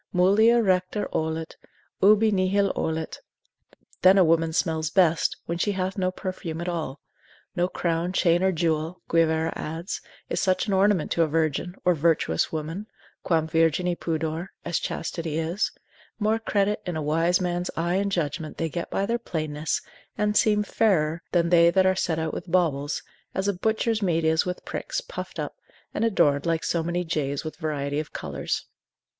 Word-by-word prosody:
Mulier 220 Hz, +6 st, +5 dB
recte 185 Hz, +1 st, +1 dB
olet, 160 Hz, 0 st, -2 dB, 0.4 s
ubi 215 Hz, +2 st, +5 dB
nihil 195 Hz, +1 st, +2 dB
olet, 160 Hz, 0 st, -2 dB, 0.8 s
then 185 Hz, +2 st, +7 dB
a 190 Hz, -, +7 dB
woman 165 Hz, -1 st, +3 dB
smells 160 Hz, -2 st, 0 dB
best, 170 Hz, -4 st, +3 dB
when 170 Hz, 0 st, -3 dB
she 205 Hz, +3 st, +1 dB
hath 190 Hz, 0 st, -2 dB
no 185 Hz, -2 st, +1 dB
perfume 185 Hz, -3 st, -5 dB
at 175 Hz, -, -4 dB
all; 160 Hz, -5 st, -3 dB, 0.6 s
no 175 Hz, 0 st, +2 dB
crown, 170 Hz, -1 st, -1 dB
chain, 175 Hz, -2 st, +3 dB
or 190 Hz, 0 st, +3 dB
jewel 165 Hz, 0 st, -1 dB
(Guivarra 160 Hz, -1 st, +2 dB
adds) 165 Hz, +5 st, -5 dB, 0.3 s
is -, -, -1 dB
such 185 Hz, -2 st, +2 dB
an 205 Hz, -, -1 dB
ornament 190 Hz, -3 st, +2 dB
to 170 Hz, -, +2 dB
a 165 Hz, -, +4 dB
virgin, 160 Hz, +3 st, -1 dB
or 180 Hz, -, +5 dB
virtuous 155 Hz, -, +1 dB
woman, 165 Hz, +7 st, -4 dB, 0.3 s
quam 160 Hz, -3 st, +1 dB
virgini 165 Hz, +2 st, +2 dB
pudor, 160 Hz, +1 st, -2 dB, 0.2 s
as 170 Hz, -, 0 dB
chastity 160 Hz, -2 st, -3 dB
is: 165 Hz, +6 st, -1 dB, 0.5 s
more 215 Hz, +1 st, +1 dB
credit 205 Hz, -2 st, 0 dB
in 180 Hz, -3 st, -4 dB
a 155 Hz, -, -2 dB
wise 165 Hz, +4 st, +2 dB
man's 175 Hz, -1 st, -1 dB
eye 170 Hz, +2 st, +1 dB
and 200 Hz, 0 st, 0 dB
judgment 155 Hz, -3 st, -2 dB
they 165 Hz, -, -1 dB
get 170 Hz, +2 st, -4 dB
by 195 Hz, -, 0 dB
their 235 Hz, +3 st, -1 dB
plainness, 155 Hz, -7 st, -2 dB, 0.3 s
and 210 Hz, 0 st, +1 dB
seem 210 Hz, -1 st, +4 dB
fairer 170 Hz, -7 st, +1 dB
than 170 Hz, -1 st, +2 dB
they 170 Hz, -1 st, +6 dB
that 190 Hz, +2 st, +3 dB
are 190 Hz, -, +4 dB
set 170 Hz, -3 st, 0 dB
out 160 Hz, -1 st, -2 dB
with -, -, -6 dB
baubles, 145 Hz, -5 st, +1 dB, 0.3 s
as 190 Hz, +1 st, 0 dB
a 200 Hz, -, +2 dB
butcher's 220 Hz, +3 st, 0 dB
meat 170 Hz, -4 st, +1 dB
is 160 Hz, +2 st, +2 dB
with 180 Hz, -, -4 dB
pricks, -, -, -3 dB
puffed -, -, -7 dB
up, -, -, -4 dB, 0.4 s
and -, -, -1 dB
adorned 150 Hz, -9 st, +2 dB
like 165 Hz, -1 st, 0 dB
so 170 Hz, -, 0 dB
many 175 Hz, +2 st, -1 dB
jays 145 Hz, -4 st, -2 dB
with 155 Hz, -, -6 dB
variety 145 Hz, -3 st, -2 dB
of 155 Hz, -, -5 dB
colours. -, -, -3 dB
170 Hz, 175 wpm, -25 LUFS, 160-190 Hz, 0.8 s, then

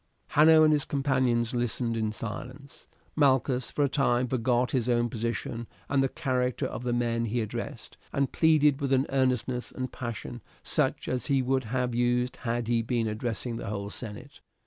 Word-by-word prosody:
Hanno 155 Hz, +1 st, +6 dB
and 155 Hz, 0 st, +5 dB
his 145 Hz, -2 st, +2 dB
companions 130 Hz, -5 st, +1 dB
listened 120 Hz, -1 st, -1 dB
in 110 Hz, -1 st, -1 dB
silence. 125 Hz, +6 st, -7 dB, 0.3 s
Malchus 130 Hz, -3 st, +2 dB
for 145 Hz, -, 0 dB
a -, -, +4 dB
time 125 Hz, -3 st, +1 dB
forgot 125 Hz, 0 st, +1 dB
his 125 Hz, -2 st, 0 dB
own 120 Hz, 0 st, +2 dB
position 115 Hz, 0 st, -3 dB, 0.2 s
and 140 Hz, -1 st, +3 dB
the 135 Hz, -, +1 dB
character 125 Hz, -4 st, -1 dB
of -, -, -4 dB
the 125 Hz, -1 st, -2 dB
men 120 Hz, -1 st, 0 dB
he 115 Hz, +2 st, -1 dB
addressed, 110 Hz, -3 st, -5 dB
and 140 Hz, -1 st, 0 dB
pleaded 150 Hz, -3 st, +3 dB
with 135 Hz, -1 st, +1 dB
an 135 Hz, +1 st, +3 dB
earnestness 125 Hz, -2 st, 0 dB
and 130 Hz, 0 st, -5 dB
passion 120 Hz, 0 st, -6 dB, 0.2 s
such -, -, 0 dB
as 130 Hz, -1 st, -2 dB
he 135 Hz, -3 st, +2 dB
would 130 Hz, 0 st, 0 dB
have 125 Hz, +1 st, -1 dB
used 120 Hz, +1 st, +1 dB
had 120 Hz, -2 st, -2 dB
he 120 Hz, -1 st, +2 dB
been 115 Hz, 0 st, -1 dB
addressing 115 Hz, +2 st, -3 dB
the -, -, -6 dB
whole 100 Hz, 0 st, -4 dB
senate. 105 Hz, -3 st, -9 dB
125 Hz, 175 wpm, -28 LUFS, 115-135 Hz, 0.3 s, Hanno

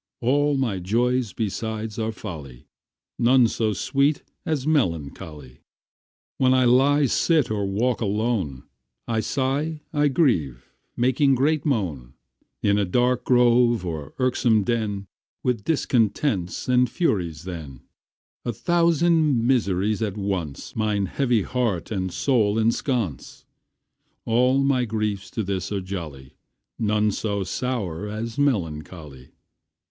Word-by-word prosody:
All 145 Hz, +4 st, +2 dB
my 115 Hz, -8 st, -1 dB
joys 120 Hz, +4 st, 0 dB
besides 110 Hz, +1 st, -4 dB
are 110 Hz, 0 st, -1 dB
folly, 75 Hz, -, -9 dB, 0.5 s
None 125 Hz, 0 st, +5 dB
so 110 Hz, -1 st, -1 dB
sweet 140 Hz, +8 st, +1 dB, 0.2 s
as 150 Hz, -4 st, -1 dB
melancholy. 80 Hz, -, -2 dB, 0.8 s
When 130 Hz, 0 st, +4 dB
I 130 Hz, -1 st, +4 dB
lie, 140 Hz, +4 st, +4 dB
sit, 150 Hz, 0 st, +2 dB
or 100 Hz, -2 st, -1 dB
walk 115 Hz, +6 st, 0 dB
alone, 105 Hz, -, -1 dB, 0.4 s
I 115 Hz, -2 st, 0 dB
sigh, 140 Hz, +6 st, -1 dB
I 145 Hz, -1 st, +3 dB
grieve, 80 Hz, -, 0 dB, 0.3 s
making 130 Hz, +3 st, +3 dB
great 150 Hz, +4 st, +1 dB
moan, 80 Hz, -, -2 dB, 0.5 s
In 100 Hz, 0 st, +3 dB
a -, -, +2 dB
dark 125 Hz, +5 st, +1 dB
grove, 120 Hz, -4 st, +4 dB
or 80 Hz, -5 st, -5 dB
irksome 120 Hz, -4 st, +2 dB
den, 105 Hz, -3 st, -2 dB, 0.4 s
With 120 Hz, -5 st, -1 dB
discontents 115 Hz, -, 0 dB
and 125 Hz, -1 st, +3 dB
Furies 90 Hz, -, -1 dB
then, 80 Hz, -8 st, -8 dB, 0.6 s
A 120 Hz, -, -2 dB
thousand 165 Hz, -, +2 dB
miseries 105 Hz, -4 st, +1 dB
at 105 Hz, -2 st, -2 dB
once 95 Hz, -8 st, -4 dB
Mine 105 Hz, -2 st, 0 dB
heavy 120 Hz, +1 st, +1 dB
heart 115 Hz, -7 st, -2 dB
and 95 Hz, -3 st, -2 dB
soul 110 Hz, -2 st, +1 dB
ensconce, 115 Hz, -, -1 dB, 0.8 s
All 125 Hz, +4 st, +3 dB
my 135 Hz, -2 st, +2 dB
griefs 105 Hz, -3 st, -2 dB
to 110 Hz, -, -3 dB
this 95 Hz, -1 st, -3 dB
are 100 Hz, -, -1 dB
jolly, 80 Hz, -9 st, -7 dB, 0.4 s
None 105 Hz, -1 st, +2 dB
so 100 Hz, -1 st, -2 dB
sour 105 Hz, -3 st, -3 dB
as 110 Hz, +5 st, -5 dB
melancholy. 80 Hz, -, -3 dB
110 Hz, 120 wpm, -24 LUFS, 95-130 Hz, 0.8 s, None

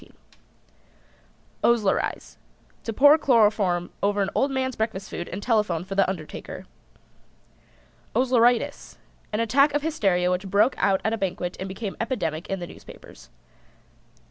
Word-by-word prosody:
OSLERIZE. 225 Hz, -5 st, 0 dB, 0.5 s
To 225 Hz, -, -2 dB
pour 290 Hz, +7 st, +6 dB
chloroform 205 Hz, -9 st, +2 dB
over 200 Hz, 0 st, +1 dB
an 195 Hz, -, -3 dB
old 275 Hz, -, +1 dB
man's 260 Hz, -2 st, -2 dB
breakfast 220 Hz, -3 st, -3 dB
food 175 Hz, -, -5 dB
and 195 Hz, +3 st, -6 dB
telephone 210 Hz, -8 st, +1 dB
for 190 Hz, +2 st, -7 dB
the 195 Hz, -1 st, +2 dB
undertaker. 165 Hz, -5 st, -7 dB, 1.5 s
OSLERITIS. 245 Hz, -2 st, +2 dB, 0.3 s
An 215 Hz, +1 st, 0 dB
attack 275 Hz, +6 st, +3 dB
of 290 Hz, -, 0 dB
hysteria 195 Hz, -, +1 dB
which 185 Hz, +2 st, -2 dB
broke 210 Hz, +6 st, +3 dB
out 195 Hz, -1 st, +2 dB
at 220 Hz, -, +1 dB
a 225 Hz, -, -2 dB
banquet 180 Hz, -2 st, -3 dB
and 190 Hz, +1 st, -5 dB
became 195 Hz, +1 st, -5 dB
epidemic 175 Hz, -, -3 dB
in 195 Hz, -, -1 dB
the 175 Hz, -, -5 dB
newspapers. -, -, -14 dB
205 Hz, 135 wpm, -25 LUFS, 190-240 Hz, 1.5 s, pour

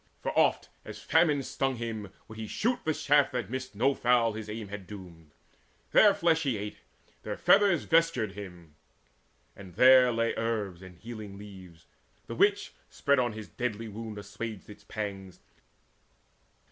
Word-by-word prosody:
For, -, -, -3 dB
oft -, -, +2 dB
as -, -, -9 dB
famine 155 Hz, -4 st, +2 dB
stung 135 Hz, 0 st, -1 dB
him, 115 Hz, -4 st, -5 dB, 0.2 s
would 110 Hz, 0 st, -11 dB
he 110 Hz, -, -5 dB
shoot 240 Hz, -, -1 dB
The 155 Hz, -, +1 dB
shaft 145 Hz, -2 st, +3 dB
that 120 Hz, -4 st, -3 dB
missed 130 Hz, -3 st, -5 dB
no 130 Hz, +7 st, +2 dB
fowl 120 Hz, -3 st, +2 dB
his 110 Hz, 0 st, -7 dB
aim 105 Hz, -1 st, -6 dB
had 100 Hz, -2 st, -8 dB
doomed. 90 Hz, -6 st, -11 dB, 0.6 s
Their 205 Hz, -2 st, +6 dB
flesh 165 Hz, -1 st, +2 dB
he 135 Hz, -7 st, 0 dB
ate, 105 Hz, +1 st, -6 dB, 0.4 s
their -, -, -5 dB
feathers 195 Hz, -6 st, +4 dB
vestured 165 Hz, -10 st, +2 dB
him. 90 Hz, -6 st, -11 dB, 0.8 s
And 95 Hz, -3 st, -12 dB
there 130 Hz, +2 st, +7 dB
lay 115 Hz, 0 st, 0 dB
herbs 105 Hz, -6 st, -2 dB
and 95 Hz, -1 st, -12 dB
healing 110 Hz, -2 st, -9 dB
leaves, 95 Hz, -5 st, -13 dB, 0.4 s
the -, -, -7 dB
which, 200 Hz, -, +2 dB, 0.2 s
Spread 140 Hz, -2 st, +1 dB
on 120 Hz, -3 st, 0 dB
his 110 Hz, -1 st, -8 dB
deadly 115 Hz, -2 st, -4 dB
wound, 110 Hz, 0 st, -7 dB
assuaged 105 Hz, 0 st, -7 dB
its 105 Hz, -, -14 dB
pangs. 95 Hz, -3 st, -6 dB
110 Hz, 160 wpm, -29 LUFS, 100-130 Hz, 0.8 s, there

